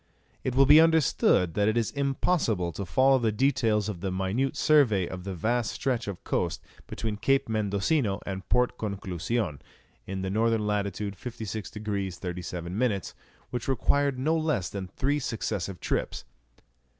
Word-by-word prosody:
It 130 - -2
will 135 +1 +6
be 150 +3 +8
understood 155 - +3
that 105 +3 +2
it 110 +2 +2
is 115 -2 0
impossible 135 - 0
to 100 +2 -6
follow 135 +6 +4
the 115 -2 +1
details 115 -4 +1
of 100 -6 -5
the 95 -1 -2
minute 100 +10 -1
survey 120 - +4
of 90 0 -7
the 95 -1 -4
vast 115 +7 0
stretch 125 -5 -1
of 100 -3 -6
coast - - -1 0.3
between 110 -2 -4
Cape 135 +5 +2
Mendocino 105 +2 0
and 95 -1 -6
Port 125 0 +2
Conclusion, 95 - -2 0.5
in 95 0 -3
N. 95 - -2
lat. 105 -3 +1
56 110 +1 -5
degrees 100 -4 -3
37 90 -1 -5
minutes, 110 -4 0 0.4
which 120 -1 -4
required 135 +1 +1
no 155 +6 +1
less 155 - 0
than 95 -2 -5
three 140 +9 -1
successive 105 -7 -3
trips. - - -2
110 Hz, 150 wpm, -27 LUFS, 95-130 Hz, 0.5 s, be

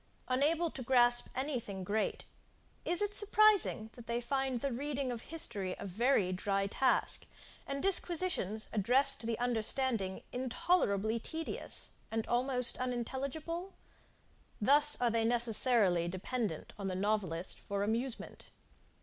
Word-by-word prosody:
Unable 305 +6 +1
to 265 - -8
grasp 240 -1 +3
any 265 0 -1
thing 195 -4 -7
great, 210 +4 -2 0.6
is 350 +4 +3
it 410 0 -1
surprising 415 - +3
that 240 -2 -13
they 235 0 -1
find 265 0 -2
the 275 +2 -2
reading 275 +1 -3
of 235 -2 -5
history 215 - -4
a - - -7
very 205 0 +1
dry 195 +2 -1
task, 260 +6 0 0.4
and 275 0 -4
disquisitions 350 - +1
addressed 260 +6 +4
to 225 - -5
the 230 -1 -1
understanding, 230 -4 -1
intolerably 235 - 0
tedious, 320 +7 -4 0.2
and 225 0 -2
almost 250 0 +2
unintelligible? 275 +9 -4 0.8
Thus 290 +6 +6
are 240 -1 +2
they 230 0 +1
necessarily 225 -6 +2
dependent 190 0 -4
on 195 - -3
the 185 - -3
novelist 190 -4 -2
for 200 0 -3
amusement. 230 +4 -4
240 Hz, 130 wpm, -33 LUFS, 215-275 Hz, 0.8 s, Thus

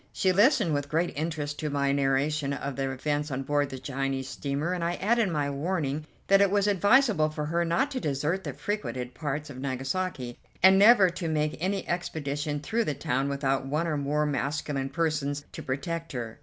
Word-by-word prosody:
She 190 - +2
listened 210 - +4
with 145 0 -1
great 165 +3 0
interest 150 -1 -3
to 155 - -2
my 140 -1 +1
narration 140 +1 +1
of 140 -1 -4
the 135 0 -1
events 145 +3 -2
on 135 0 -3
board 145 0 +1
the 130 - -6
Chinese 135 0 -3
steamer, 145 +6 -2
and 180 -2 -2
I 170 +1 0
added 225 +1 +2
my 150 -4 0
warning 150 -1 -2 0.2
that 195 0 +5
it 200 - +5
was 200 0 +2
advisable 205 - +4
for 155 -1 -4
her 170 +3 0
not 255 +13 +1
to 260 - -2
desert 150 - -1
the - - -4
frequented 130 -12 -4
parts 145 -1 -4
of 130 - -9
Nagasaki, 135 0 -3 0.2
and 190 +1 +8
never 205 -3 +7
to 175 -1 -4
make 155 -1 0
any 190 +3 -1
expedition 150 -4 -2
through 225 +8 0
the 145 - -1
town 135 +2 -1
without 135 -1 0
one 150 +4 0
or 160 -2 -1
more 145 +1 0
masculine 145 -1 -2
persons 145 -2 -1
to - - -7
protect 165 +5 -4
her. 115 -1 -5
150 Hz, 195 wpm, -28 LUFS, 140-175 Hz, 0.2 s, and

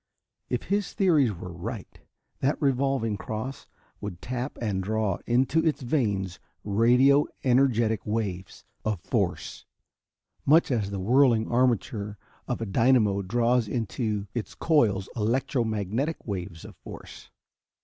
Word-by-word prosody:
If 125 - -1
his 200 0 -1
theories 155 - +3
were 90 -1 -8
right, 85 - -7 0.4
that 135 +3 0
revolving 135 -5 +1
cross 110 +8 -5 0.3
would 95 -4 -6
tap 125 +5 -4
and 105 -5 -1
draw 105 -1 -1
into 130 +7 +2
its 155 -3 0
vanes 100 - -1 0.2
radio 125 +7 +4 0.2
energetic 120 -5 +2
waves 100 -4 -4 0.2
of 110 -4 -1
force, - - -2 0.8
much 155 +1 +4
as 110 -5 0
the 100 -1 -4
whirling 120 +2 +3
armature 115 -4 0 0.3
of - - -2
a - - -1
dynamo 110 -2 +3
draws 120 +3 +1
into 110 -2 -2
its 120 -3 -5
coils 110 - +2
electro 125 +4 0
magnetic 110 - -2
waves 90 -5 -5
of - - -11
force. - - -11
115 Hz, 125 wpm, -27 LUFS, 100-130 Hz, 0.8 s, radio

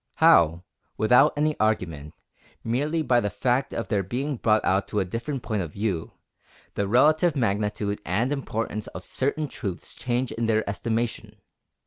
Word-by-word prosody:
How, 85 +1 +5 0.3
without 125 +7 +5
any 150 +1 +1
argument, 85 -8 -1 0.5
merely 150 +8 0
by 125 -3 +3
the 105 - -1
fact 125 +6 0
of 115 - -4
their 100 - +1
being 130 +8 -3
brought 110 -1 +2
out 95 +1 +1
to 105 - -1
a 95 - 0
different 120 +7 -4
point 105 -3 -1
of 80 -4 -6
view, 100 -6 -2 0.6
the 100 - -1
relative 155 - +4
magnitude 105 -3 -1
and 115 +10 0
importance 115 -6 -3
of 90 - -9
certain 145 +7 -1
truths 95 -9 -6
change 125 0 -2
in 115 0 -2
their 110 -1 +1
estimation! 115 +3 -3
110 Hz, 155 wpm, -25 LUFS, 100-130 Hz, 0.6 s, How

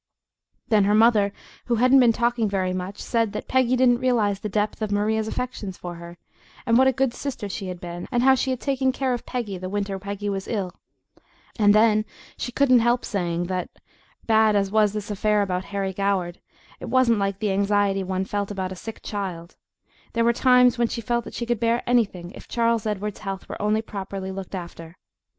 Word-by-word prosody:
Then 210 -3 +4
her 205 +1 +3
mother, 215 -2 +4 0.3
who 240 - +1
hadn't 255 +4 +5
been 245 -2 +6
talking 235 -1 0
very 185 -2 -1
much, 185 +2 -5
said 230 -3 -1
that - - -5
Peggy 255 -1 +2
didn't 245 -1 +4
realize 220 -6 +1
the 210 - -4
depth 210 +2 -1
of 215 -1 -2
Maria's 215 +2 0
affection 235 -4 -4
for 175 -1 -7
her, 170 0 -10 0.5
and 230 -2 +3
what 260 +2 +6
a - - +5
good 260 -1 0
sister 250 -7 -5
she 195 0 -5
had 180 -1 -6
been, 175 0 -7
and 245 -1 +1
how 265 0 +6
she 265 0 0
had 255 -2 -1
taken 265 -1 0
care 260 -1 -1
of 240 - -5
Peggy 215 -7 -4
the 185 0 -5
winter 200 0 -2
that - - -22
Peggy 200 +1 -4
was 195 -1 -3
ill 195 -5 -3 0.9
and 205 -1 +5
then 215 0 +4 0.3
she 245 - -5
couldn't 255 -1 +4
help 240 +1 +1
saying 175 -4 -2
that, 180 0 -3 0.6
bad 220 -1 +4
as 195 -1 +1
was 210 -1 +3
this 210 0 -4
affair 210 +1 +1
about 185 -1 -2
Harry 195 -1 -3
Goward, 190 -3 -1 0.4
it - - -7
wasn't 250 -4 +3
like 195 -1 -1
the 210 -1 -1
anxiety 200 0 +1
one 190 0 -2
felt 205 0 -3
about 190 -2 -4
a - - -5
sick 225 +4 -9
child; 185 -5 -5 0.6
there 230 0 +1
were 235 - +4
times 250 0 +4
when 235 - +3
she 230 - -4
felt 235 0 -1
that - - -9
she 235 - -3
could 235 -2 -1
bear 230 +1 +1
anything 200 -8 0
if - - -12
Charles 230 -2 +1
Edward's 210 -1 -3
health 195 -2 -6
were - - -7
only 215 +1 +1
properly 195 -2 -6
looked 195 0 -6
after. 170 -1 -8
210 Hz, 210 wpm, -24 LUFS, 195-235 Hz, 0.9 s, been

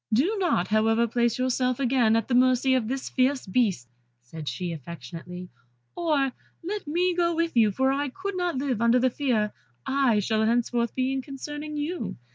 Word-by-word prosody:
"Do 295 - +2
not, 295 - +1
however, 225 +2 +3
place 235 0 +1
yourself 255 0 0
again 245 -4 +3
at 225 - 0
the 255 - -2
mercy 255 +1 +4
of 250 -4 +1
this 265 +2 -3
fierce 260 +1 +1
beast," 190 - 0 0.4
said 150 +4 -6
she, 170 +8 -4
affectionately, 170 +4 -8 0.5
"or 300 -6 +1 0.3
let 400 0 -4
me 355 +4 +1
go 340 -1 +1
with 335 -2 -1
you, 220 -3 +5
for 265 +6 +1
I 285 +1 -1
could 380 +8 -5
not 355 -5 -1
live 260 -5 -1
under 235 +1 +4
the 255 0 +2
fear 230 -7 0 0.3
I 265 -5 +2
shall 215 +2 +1
henceforth 235 +1 0
be 260 0 0
in 270 - -1
concerning 295 +2 -6
you. 320 +4 -3
255 Hz, 180 wpm, -26 LUFS, 220-285 Hz, 0.5 s, you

